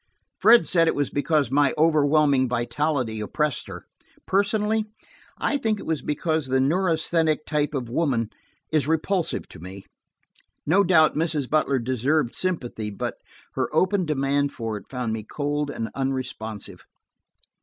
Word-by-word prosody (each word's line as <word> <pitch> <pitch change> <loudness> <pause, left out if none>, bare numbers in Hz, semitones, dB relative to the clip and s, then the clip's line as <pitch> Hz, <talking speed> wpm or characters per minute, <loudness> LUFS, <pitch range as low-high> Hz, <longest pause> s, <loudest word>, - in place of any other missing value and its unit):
Fred 235 +1 +6
said 165 -2 +3
it - - +2
was 145 -1 -1
because 145 -3 +1
my 145 0 +3
overwhelming 150 -4 +3
vitality 125 -1 -1
oppressed 150 +7 -2
her. - - -9 0.4
Personally, 210 +2 +1 0.5
I 290 - 0
think 220 -4 0
it - - -9
was 160 -2 -1
because 155 0 -1
the 130 0 +2
neurasthenic 160 0 +1
type 150 -1 -1
of 125 -3 -3
woman 120 -4 0 0.4
is 155 -3 +1
repulsive 160 +3 0
to - - -11
me. 95 +3 -10 0.8
No 185 +7 +4
doubt 165 -4 +5
Mrs. 155 -4 -1
Butler 150 -2 +2
deserved 130 +2 0
sympathy, 125 -12 -2
but 100 - -4 0.4
her - - -1
open 185 +2 +2
demand 140 -1 0
for 115 -2 -4
it 105 - -9
found 125 -4 -3
me 110 - -3
cold 145 +5 -2
and 115 -5 -4
unresponsive. 130 -6 -4
145 Hz, 145 wpm, -24 LUFS, 130-160 Hz, 0.8 s, Fred